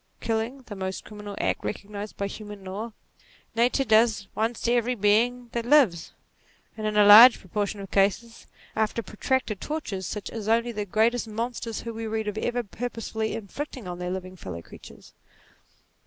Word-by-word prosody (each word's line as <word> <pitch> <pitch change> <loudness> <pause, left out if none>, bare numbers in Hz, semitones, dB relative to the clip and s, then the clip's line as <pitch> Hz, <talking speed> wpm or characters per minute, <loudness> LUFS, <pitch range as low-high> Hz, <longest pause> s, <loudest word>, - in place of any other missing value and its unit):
Killing, 230 +4 -2
the 210 - -8
most 190 -1 -4
criminal 210 -1 -8
act - - -1
recognized 205 0 -6
by 200 - -1
human 205 0 -8
laws, 205 +5 -5 0.6
Nature 245 +4 +2
does 220 -3 +3
once 225 +1 -1
to 240 - +1
every 245 +1 +1
being 235 +4 +2
that 235 - -2
lives; 235 - +3 0.6
and 215 -1 -3
in 210 0 -1
a 210 - +7
large 225 +4 +10
pro - - -17
portion 205 +2 -2
of 195 -1 -8
cases, 205 +4 0 0.3
after 220 +1 0
protracted 215 +1 -1
tortures 215 - -4
such 210 - -5
as 220 -2 -6
only 230 +2 +2
NATURE - - -5
29 - - -18
the - - -28
greatest 230 +2 +2
monsters 230 0 -4
whom 230 -1 -6
we 225 0 -4
read 220 0 -2
of 210 +1 -2
ever 245 +1 -1
purposely 220 0 -4
inflicted 230 +3 -6
on 175 -1 -6
their 180 0 -3
living 185 0 -5
fellow 85 - -7
creatures. - - -14
220 Hz, 180 wpm, -26 LUFS, 205-235 Hz, 0.6 s, large